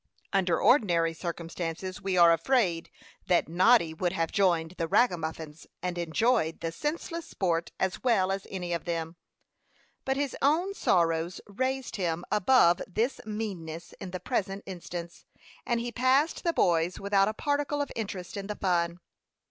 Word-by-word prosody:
Under 185 -3 +2
ordinary 170 - +3
circumstances, 170 +2 -5
we 190 -2 -1
are 170 -1 +7
afraid 180 -5 +1 0.4
that 180 -1 +3
Noddy 175 +1 +4
would 175 +2 -1
have 165 -3 -1
joined 170 -4 +2
the 165 - 0
ragamuffins 160 -6 0 0.2
and 180 -1 -2
enjoyed 170 0 +1
the 165 - -3
senseless 325 - -4
sport 170 -3 -1
as 190 -1 -1
well 195 -7 +3
as 195 0 -3
any 180 -2 -4
of 170 - -3
them; 165 -1 -3 0.9
but 265 0 -1
his 280 -2 -1
own 335 +8 +2
sorrows 170 - +1
raised 260 +5 -2
him 175 -2 -2
above 205 -4 +4
this 225 +8 -1
meanness 180 -7 -5
in 195 - -6
the 185 0 -5
present 200 -5 -2
instance, 175 -2 -7 0.4
and 235 -2 +1
he 240 +1 -3
passed 260 +6 +2
the 340 - +2
boys 170 - +2
without 200 0 +3
a 215 - -1
particle 290 +2 -1
of 285 - -2
interest 195 -5 -5
in 200 -1 -5
the 210 - -4
fun. 175 -3 0
185 Hz, 155 wpm, -28 LUFS, 170-235 Hz, 0.9 s, are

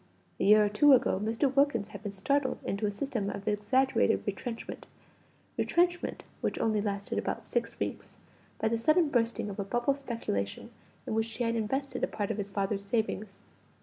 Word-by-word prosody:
A - - 0
year 210 +1 +7
or - - +1
two 275 +8 +6
ago, 250 -7 +3
Mr. 230 +5 +1
Wilkins 275 -7 +3
had 200 - -9
been 205 -2 -4
startled 265 +8 0
into 205 +2 -1
a - - -1
system 210 -2 -2
of 200 +1 -6
exaggerated 210 - +2
retrenchment 230 +4 -5 0.7
retrenchment 350 0 +1 0.2
which - - -1
only 215 -2 +1
lasted 200 -1 -2
about - - -3
six - - -2
weeks - - -4 0.4
by 220 - +1
the 230 +1 0
sudden 310 +5 +4
bursting 230 -3 0
of 205 0 -6
a - - 0
bubble 240 +7 +1
speculation 230 - -4 0.3
in - - -3
which 225 +1 0
he 245 - 0
had 230 0 +1
invested 265 +5 -2
a - - +3
part 205 0 -2
of 220 - -3
his 200 -1 -3
father's 200 0 -1
savings. 215 -1 -2
220 Hz, 180 wpm, -30 LUFS, 200-260 Hz, 0.7 s, year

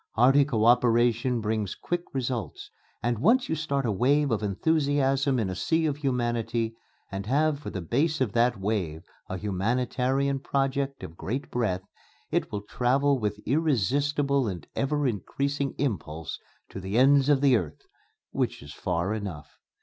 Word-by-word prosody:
Hearty 135 +5 +5
co 115 -6 0
operation 120 0 +3
brings 105 -2 -2
quick 175 0 -3
results, 120 - -4 0.3
and 120 -1 0
once 245 - +4
you - - -1
start 140 -3 -1
a 115 - +1
wave 140 +7 +2
of 110 - 0
enthusiasm 140 +4 +1
in 110 -5 0
a 95 - -3
sea 160 - +1
of 145 -2 0
humanity, 120 -4 -1 0.4
and 95 +1 -5
have 145 +3 +2
for 150 - -6
the 95 - -5
base 150 - +1
of 130 -6 +1
that 120 -1 +2
wave 95 -6 -2 0.3
a 95 - -3
humanitarian 125 +7 0
project 135 0 -1
of 80 - -8
great 130 +11 -4
breadth, 95 -7 -1 0.5
it - - 0
will 105 - -3
travel 135 +5 +1
with 105 -1 -2
irresistible 140 - +1
and 90 -6 -5
ever 145 +1 0
increasing 140 +5 -2
impulse 80 - -3 0.3
to - - -7
the 95 +3 -2
ends 140 +2 +5
of 145 -2 +5
the 135 -3 +5
earth 80 -9 -3 0.5
which - - -2
is 70 0 -10
far 90 +2 -1
enough. 100 -8 -6
125 Hz, 155 wpm, -27 LUFS, 105-140 Hz, 0.5 s, Hearty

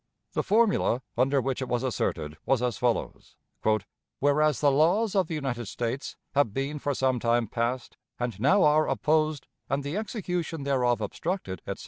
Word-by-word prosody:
The - - +1
formula 205 - +2
under 135 +3 +3
which 135 0 -2
it 130 - -2
was 120 0 -1
asserted 75 -11 -2
was 130 -3 +1
as 125 -1 -1
follows: 120 -2 -2 0.8
"Whereas 145 -2 +3
the 145 - +4
laws 180 +10 +3
of 190 -3 +2
the 165 - -3
United 125 -6 -3
States 120 +5 -4 0.2
have 140 -7 +2
been 140 +2 -2
for 145 0 -1
some 130 -1 +1
time 120 0 +2
past 120 +3 -2 0.2
and 120 -5 -3
now 185 - +4
are 155 +1 +4
opposed, 155 -2 +1 0.2
and 140 +2 0
the 145 +7 -3
execution 180 - -3
thereof 125 -4 +1
obstructed, 105 - -3
etc. - - -4
135 Hz, 165 wpm, -27 LUFS, 120-155 Hz, 0.8 s, the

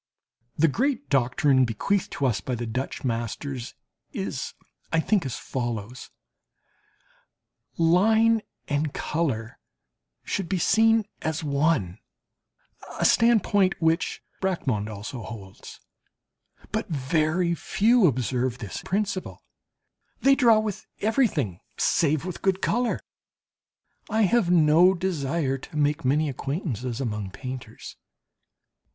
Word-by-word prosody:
The 165 - +5
great 270 - -1
doctrine 130 0 +3
bequeathed 130 - 0
to 140 - -1
us 110 -8 +1
by 125 +6 -3
the 120 0 -4
Dutch 125 +4 -4
masters 120 +1 -3 0.4
is, - - -4 0.4
I 165 - +3
think, 185 -2 +1
as 125 - -4
follows: 120 -1 -5 1.7
Line 220 +7 +4 0.3
and 145 0 -1
colour 130 -8 -2 0.6
should 190 -4 -3
be 190 - +1
seen 225 +4 +4 0.2
as 160 0 -2
one, 140 - 0 1.0
a - - +2
standpoint 205 -4 +3
which 165 +1 0 0.2
Bracquemond 130 - -1
also 110 +4 -6
holds. 100 -4 -10 0.9
But - - -2
very 155 +4 +1
few 220 +4 +3
observe 125 -2 -1
this 110 -6 -6
principle, 195 -1 -3 0.8
they 275 - +5
draw 235 -5 +5
with 215 -2 -3
everything, 195 - +1 0.2
save 155 -1 +2
with 185 -2 -6
good 190 -1 +1
colour. 240 +4 0 1.1
I 220 +1 +2
have 205 -1 +3
no 170 +2 +5
desire 155 -6 -1
to 150 - -9
make 145 0 +1
many 150 +4 +2
acquaintances 135 - -3
among 105 -6 -3
painters. 125 +1 -8
150 Hz, 110 wpm, -25 LUFS, 125-190 Hz, 1.7 s, The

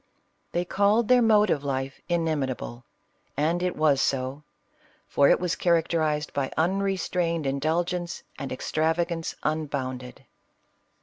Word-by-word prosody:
They 175 +1 -1
called 205 +5 +2
their 250 -1 +5
mode 215 -3 +4
of 145 - 0
life 135 -1 -3
" - - -39
inimitable 135 -7 -2 0.3
:" - - -43
and 165 +4 +1
it 180 -1 -1
was 150 -3 +3
so 135 +1 -1 0.3
— - - -34
for 140 - +4
it - - +5
was 180 -2 -1
characterized 160 -3 +1
by 140 -2 -1
unrestrained 180 -2 0
indulgence 170 +5 -1 0.2
and 135 - -5
ex 130 - -5
travagance 165 +1 0
unbounded. 135 -5 -3
160 Hz, 135 wpm, -26 LUFS, 140-175 Hz, 0.3 s, their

